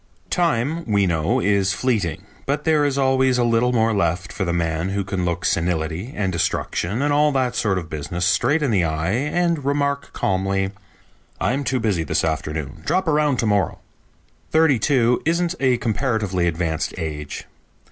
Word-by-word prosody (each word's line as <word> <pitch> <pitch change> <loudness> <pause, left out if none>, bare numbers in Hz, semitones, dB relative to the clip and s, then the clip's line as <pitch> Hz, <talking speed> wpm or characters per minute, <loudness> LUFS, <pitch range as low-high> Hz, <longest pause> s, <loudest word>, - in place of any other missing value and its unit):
Time, 165 -1 +1
we 100 -1 +3
know, 85 +8 +1
is 100 -3 +2
fleeting, 100 -9 -1 0.2
but 145 +2 -1
there 155 -1 +3
is 140 -1 0
always 130 -1 +3
a 125 - +2
little 120 +1 +2
more 115 -2 +2
left 85 -3 -1
for 95 - -2
the 85 - -1
man 85 0 -1
who 100 0 -1
can 95 -2 -2
look 85 0 -2
senility 85 +5 -1
and 95 -3 -1
destruction 100 +6 -1
and 145 0 +2
all 150 +1 +4
that 130 -3 0
sort 100 -5 +1
of 85 -3 -4
business 80 +3 -3
straight 145 - +2
in 135 - +1
the 95 -5 +2
eye 80 +2 -1
and 150 - 0
remark 140 0 -1
calmly, 95 0 0 0.7
"I'm 135 +3 0
too 130 -1 0
busy 105 -7 0
this 80 - 0
afternoon; 75 -1 -3
drop 185 - 0
around 150 -3 +2
to - - -1
morrow." 105 -2 +1 0.7
Thirty 160 -6 +4
two 125 -1 +2
isn't 170 +2 +1
a 130 -2 +3
comparatively 110 -7 0
advanced 80 -1 -2
age. 75 -4 -5
110 Hz, 170 wpm, -22 LUFS, 85-135 Hz, 0.7 s, all